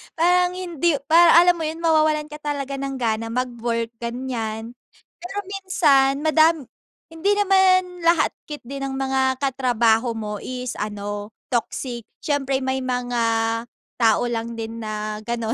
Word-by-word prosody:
parang 360 +2 +3
hindi 345 -3 0
parang, 335 +1 +7
alam 355 0 +4
mo 325 - -3
yun, 320 +2 -5
mawawalan 310 -2 +2
ka 300 - -7
talaga 280 -2 -3
ng 275 0 -3
gana 230 -3 -1
mag-work, 235 -2 -2
ganiyan. 235 -2 -4 0.5
Pero 360 +3 -8
minsan 290 -9 +2
madami 315 0 +4 0.5
hindi 335 +6 +1
naman 375 -2 +3
lahat 335 -1 +4 0.2
ket 295 -1 -7
di 275 +3 -6
ng 275 0 -3
mga 265 -1 +1
katrabaho 245 -3 +2
mo 210 -1 -4
is 250 -1 -5
ano, 205 0 -5 0.2
toxic. 240 -1 -3 0.2
Siyempre 275 -2 0
may 260 0 -1
mga 245 -1 -2 0.8
tao 225 -2 +4
lang 230 0 -3
din 225 0 -5
na 215 -1 -4
gano'n. 230 0 -2
265 Hz, 140 wpm, -22 LUFS, 230-320 Hz, 0.8 s, parang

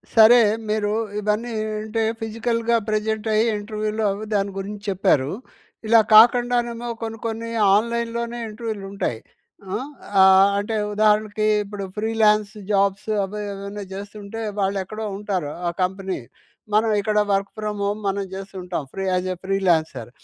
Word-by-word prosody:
సరే. 225 +2 +8 0.3
మీరు 210 -1 0 0.3
ఇవన్నీ 210 +3 -1 0.3
అంటే 220 +1 -2 0.2
ఫిజికల్‌గా 230 +1 -1
ప్రెజెంట్ 215 +1 -1
అయ్యి 220 +2 +3
ఇంటర్వ్యూలో 215 +1 -3
అవి 205 +2 -5
దాని 200 0 0
గురించి 205 +1 -6
చెప్పారు. 180 -8 +2 0.6
ఇలా 230 0 +7 0.2
కాకుండానేమో 240 +1 +4
కొన్ని 225 0 -4
కొన్ని 230 0 -3 0.3
ఆన్‍లైన్‍లోనే 235 +2 -1
ఇంటర్వ్యూలు 215 -2 -5
ఉంటాయి. 120 - -2 0.5
హ్మ్, 240 +9 -3 0.3
ఆహ్, 190 +1 +7
అంటే 215 +2 -3 0.2
ఉదాహరణకి 215 0 +2 0.2
ఇప్పుడు 200 0 -7
ఫ్రీలాన్స్ 215 -1 +2 0.2
జాబ్స్ 200 +1 +1
అవి 210 +2 -5
ఏవైనా 200 +1 -6
చేస్తుంటే 205 +2 -8 0.2
వాళ్ళు 195 0 0
ఎక్కడో 215 +3 -6
ఉంటారు 190 -7 -3 0.2
ఆ - - +2
కంపెనీ. 190 -1 -2 0.5
మనం 220 +1 +3
ఇక్కడ 210 +1 +1
వర్క్ 195 0 0
ఫ్రామ్ 210 -1 -3
హోమ్ 205 +1 -1
మనం 195 0 0
చేస్తూ 195 +1 -8
ఉంటాం. 180 -4 -3
Free 195 - -4
as 185 0 0
a - - -8
freelancer. 170 - 0
210 Hz, 135 wpm, -22 LUFS, 195-225 Hz, 0.6 s, సరే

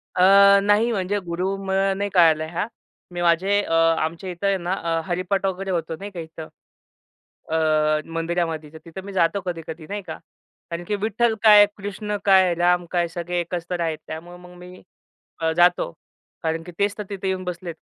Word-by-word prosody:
अ, 200 +2 +7
नाही 210 +3 +3
म्हणजे 200 0 -1
गुरु 180 +2 -3
नाही, 195 0 +1
मग - - -3
कळलं 160 -3 +4
ह्या. 175 +6 -2 0.4
मी 175 - -4
माझे 185 +4 +3
अ, 165 - -3 0.3
आमच्या 165 +4 -3
इथं 180 +3 -3
आहे 195 - +2
ना, 180 +1 -3
अ, 165 -3 -1
हरिपाठ 185 +2 -1
वगैरे 190 0 -2
होतो 165 -2 -2
नाही 200 +1 -7
का 180 - -8
इथं, 160 -1 -8 1.0
अ, 155 -1 +2
मंदिरामध्ये. 165 -2 -2
तर - - -9
तिथं 175 +3 -9
मी 200 - -8
जातो 185 +1 +1
कधी-कधी 165 -2 -6
नाही 205 +1 -4
का, - - -6 0.5
कारण 170 +1 -4
की 210 - 0
विठ्ठल 220 +2 0
काय 210 -1 +9
कृष्ण 205 +1 -4
काय 190 -3 +5
राम 175 0 +2
काय 175 -1 +1
सगळे 175 +1 -3
एकच 175 0 -4
आहेत. 160 -2 -1
त्यामुळं 175 +3 -8
मग 180 0 -14
मी 180 +1 -12 0.8
जातो, 175 - +3 0.5
कारण 160 0 -1
की 175 - -10
तेच 200 +1 0
तर 210 - -4
तिथं 195 -1 -4
येऊन 185 -1 -2
बसलेत 175 -1 -6
180 Hz, 180 wpm, -23 LUFS, 165-195 Hz, 1.0 s, काय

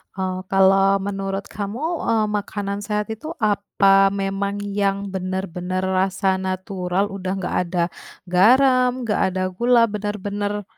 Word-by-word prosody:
Eee, 185 -1 -2
kalau 195 +1 +4
menurut 195 0 -3
kamu, 205 +6 -5 0.3
eee, 225 -2 +2
makanan 200 0 -4
sehat 210 +1 -2
itu 235 +9 -6
apa 200 -2 +3
memang 200 0 -2
yang 200 0 -1
benar-benar 185 -1 -3
rasa 190 0 +1
natural, 185 +1 -2
udah 190 -1 -3
enggak 190 -2 -3
ada 175 -1 0 0.4
garam, 250 +7 +4
enggak 215 -3 0
ada 185 - -2
gula, 235 +5 +3
benar-benar, 205 0 -3
195 Hz, 125 wpm, -22 LUFS, 190-205 Hz, 0.4 s, kalau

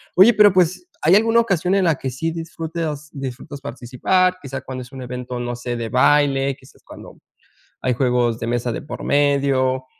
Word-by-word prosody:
Oye, 195 +6 +7
pero, 210 -1 +6
pues, 180 0 +1 0.2
¿hay 165 +5 +5
alguna 225 +2 +4
ocasión 190 -4 0
en 195 - +2
la 165 -2 +3
que 135 - -4
sí 150 +6 -3
disfrutas 160 -2 -5
disfrutas 135 0 -7
participar? 145 +9 0
Quizá 135 -1 -6
cuando 130 0 -7
es 125 0 -12
un 135 -2 -8
evento, 125 0 -6
no 120 0 -3
sé, 120 0 -4
de 115 -1 -4
baile, 135 +2 +3
quizás 130 -1 -21
cuando - - -13 0.6
hay 125 - 0
juegos 125 -2 +1
de 115 - -4
mesa 120 0 -1
de - - -4
por 150 - -8
medio. 135 -2 +1
140 Hz, 185 wpm, -20 LUFS, 125-165 Hz, 0.6 s, Oye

